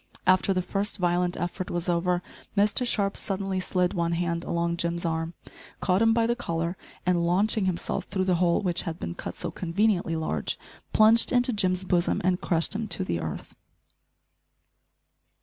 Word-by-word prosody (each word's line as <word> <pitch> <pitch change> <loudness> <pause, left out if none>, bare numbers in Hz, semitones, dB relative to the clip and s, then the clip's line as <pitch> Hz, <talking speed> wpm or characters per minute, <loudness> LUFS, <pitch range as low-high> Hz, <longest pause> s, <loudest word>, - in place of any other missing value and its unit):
After 185 +1 +4
the 185 -1 +1
first 200 +3 -2
violent 175 -1 +1
effort 175 +1 -3
was 175 0 -3
over, 175 +1 +1 0.3
Mr 210 +5 +3
Sharp 200 -4 +1
suddenly 195 -1 -2
slid 180 0 0
one 170 -2 0
hand 170 0 -1
along 170 0 -1
Jim's 170 0 -1
arm, 165 0 -2 0.4
caught 185 +2 +2
him 225 0 +5
by 225 0 +3
the 235 +1 +1
collar, 170 -5 -2 0.3
and, 175 -1 +2
launching 195 +4 +2
himself 180 -2 -2
through 190 -1 -1
the 185 -2 +2
hole 175 +2 +3
which 175 -2 +1
had 165 -2 -5
been 85 - -4
cut - - -7
so - - -4
conveniently 180 -1 0
large, 155 - -2 0.3
plunged 220 +2 +5
into 245 0 +2
Jim's 185 -3 +1
bosom 180 -1 +1
and 180 0 +1
crushed 165 +1 0
him 215 +1 -3
to - - -2
the 85 -2 -2
earth. 80 -2 -6
180 Hz, 170 wpm, -27 LUFS, 170-195 Hz, 0.4 s, him